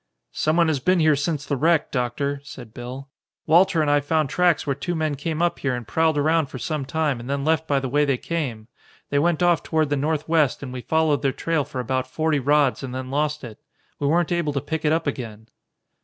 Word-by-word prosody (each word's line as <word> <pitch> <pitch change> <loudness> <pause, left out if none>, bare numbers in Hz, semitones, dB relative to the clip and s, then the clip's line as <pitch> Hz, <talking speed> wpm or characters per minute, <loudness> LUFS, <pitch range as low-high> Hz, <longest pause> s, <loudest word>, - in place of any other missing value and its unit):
"Someone 165 +2 +2
has 155 -4 +1
been 185 +7 +2
here 155 -2 +4
since 145 0 -2
the 140 - -1
wreck, 160 +3 +2
Doctor," 140 +3 -2
said 125 -6 -11
Bill. 125 +3 -7 0.4
"Walter 170 0 +4
and 145 - +1
I 145 - +4
found 150 0 0
tracks 175 -3 +2
where 140 - 0
two 175 +6 -4
men 155 -2 0
came 155 +4 -2
up 175 - 0
here 130 -2 -1
and 120 -3 -7
prowled 160 +2 +1
around 155 +1 +2
for 130 - -8
some 150 +2 -3
time 145 -2 -1
and 120 +2 -8
then 140 0 -1
left 160 0 +1
by 140 -1 +2
the 135 - -3
way 145 +4 +2
they 140 -3 +1
came. 125 -9 -4 0.4
They 140 - +3
went 170 +2 +1
off 175 -2 +3
toward 155 -2 0
the - - +3
northwest, 155 0 +1
and 130 -2 -6
we 125 - -5
followed 160 0 +1
their 135 -1 +1
trail 160 +2 -1
for 135 -2 -7
about 130 +1 -1
forty 155 +1 0
rods 145 0 +2
and 130 -2 -6
then 130 0 -5
lost 150 +1 -1
it. 115 -4 -9 0.4
We 145 - 0
weren't 170 +3 +2
able 170 -4 0
to 140 - 0
pick 160 +3 -4
it 150 - +3
up 165 +1 +1
again." 115 -6 -5
145 Hz, 230 wpm, -23 LUFS, 135-160 Hz, 0.4 s, here